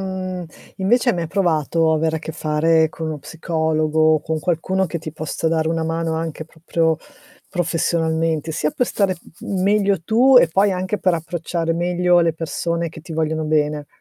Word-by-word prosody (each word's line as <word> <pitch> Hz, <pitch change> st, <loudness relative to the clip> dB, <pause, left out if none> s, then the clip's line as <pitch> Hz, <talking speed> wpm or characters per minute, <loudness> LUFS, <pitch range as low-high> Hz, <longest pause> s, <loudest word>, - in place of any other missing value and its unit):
mhmm, 185 Hz, -1 st, -4 dB, 0.3 s
invece 240 Hz, +6 st, +3 dB
hai -, -, -1 dB
mai 170 Hz, -2 st, -3 dB
provato 165 Hz, -3 st, +1 dB
avere 160 Hz, 0 st, +1 dB
a -, -, -3 dB
che 160 Hz, 0 st, -7 dB
fare 160 Hz, +1 st, +2 dB
con 160 Hz, +1 st, -6 dB
uno 155 Hz, -1 st, -4 dB
psicologo 155 Hz, +1 st, +1 dB
o 155 Hz, -, +1 dB
con 160 Hz, +1 st, -3 dB
qualcuno 185 Hz, +3 st, 0 dB
che 170 Hz, 0 st, -4 dB
ti 155 Hz, -1 st, -7 dB
possa 155 Hz, +1 st, -4 dB
dare 160 Hz, -1 st, +1 dB
una 165 Hz, 0 st, -1 dB
mano 165 Hz, 0 st, -1 dB
anche 160 Hz, -1 st, -4 dB
proprio 160 Hz, 0 st, -1 dB, 0.5 s
professionalmente, 165 Hz, -2 st, 0 dB
sia 150 Hz, -1 st, -1 dB
per 250 Hz, -, +1 dB
stare 195 Hz, -4 st, 0 dB, 0.3 s
m 190 Hz, -2 st, -2 dB
meglio 200 Hz, -1 st, +2 dB
tu 250 Hz, +7 st, +4 dB
e 170 Hz, -, +5 dB
poi 195 Hz, +4 st, +2 dB
anche 185 Hz, +3 st, -2 dB
per 185 Hz, -1 st, +2 dB
approcciare 165 Hz, 0 st, -2 dB
meglio 175 Hz, +1 st, +2 dB
le 170 Hz, -1 st, +3 dB
persone 170 Hz, +1 st, -2 dB
che 160 Hz, -, -11 dB
ti 165 Hz, +1 st, -10 dB
vogliono 160 Hz, 0 st, -1 dB
bene. 150 Hz, -1 st, 0 dB
165 Hz, 180 wpm, -20 LUFS, 160-180 Hz, 0.5 s, e